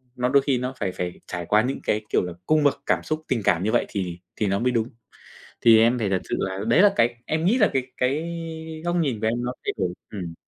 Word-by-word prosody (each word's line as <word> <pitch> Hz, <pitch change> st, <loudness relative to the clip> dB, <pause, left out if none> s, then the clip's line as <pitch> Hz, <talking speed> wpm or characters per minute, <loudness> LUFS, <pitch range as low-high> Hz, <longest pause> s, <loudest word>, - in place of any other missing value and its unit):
nó 125 Hz, 0 st, 0 dB
đôi 140 Hz, +1 st, +5 dB
khi 135 Hz, -3 st, +1 dB
nó 125 Hz, +2 st, -3 dB
phải 100 Hz, -3 st, -1 dB
phải 90 Hz, -1 st, -5 dB
trải 90 Hz, -2 st, -4 dB
qua 105 Hz, +4 st, +4 dB
những 130 Hz, +2 st, -2 dB
cái, 105 Hz, 0 st, 0 dB
kiểu -, -, +2 dB
là, 90 Hz, -1 st, -5 dB
cung 155 Hz, -1 st, +3 dB
bậc 145 Hz, -, +2 dB
cảm -, -, +1 dB
xúc, 155 Hz, 0 st, -2 dB
tình 120 Hz, -4 st, 0 dB
cảm 90 Hz, -1 st, +2 dB
như 110 Hz, -, +1 dB
vậy 120 Hz, -, +2 dB
thì 90 Hz, -3 st, -4 dB, 0.2 s
thì 105 Hz, -, 0 dB
nó 100 Hz, 0 st, +1 dB
mới 125 Hz, +1 st, +1 dB
đúng. 115 Hz, 0 st, 0 dB, 0.7 s
Thì 115 Hz, -1 st, +7 dB
em 120 Hz, +2 st, +4 dB
phải 105 Hz, -4 st, 0 dB
thật 95 Hz, -1 st, 0 dB
sự -, -, +1 dB
là 95 Hz, 0 st, -2 dB
đấy 150 Hz, +11 st, +5 dB
là 205 Hz, -1 st, +6 dB
cái 120 Hz, +1 st, +2 dB
em 160 Hz, +1 st, -1 dB
nghĩ 225 Hz, +8 st, +3 dB
là 215 Hz, -, +4 dB
cái 130 Hz, -1 st, -1 dB
cái 150 Hz, +7 st, 0 dB, 0.5 s
góc 175 Hz, 0 st, 0 dB
nhìn 135 Hz, -10 st, 0 dB
của 110 Hz, -, 0 dB
em 120 Hz, +2 st, 0 dB
nó 125 Hz, -, -2 dB
thay -, -, 0 dB
đổi. 90 Hz, -1 st, 0 dB, 0.2 s
Ừm. 85 Hz, -5 st, -6 dB
120 Hz, 270 wpm, -24 LUFS, 100-135 Hz, 0.7 s, Thì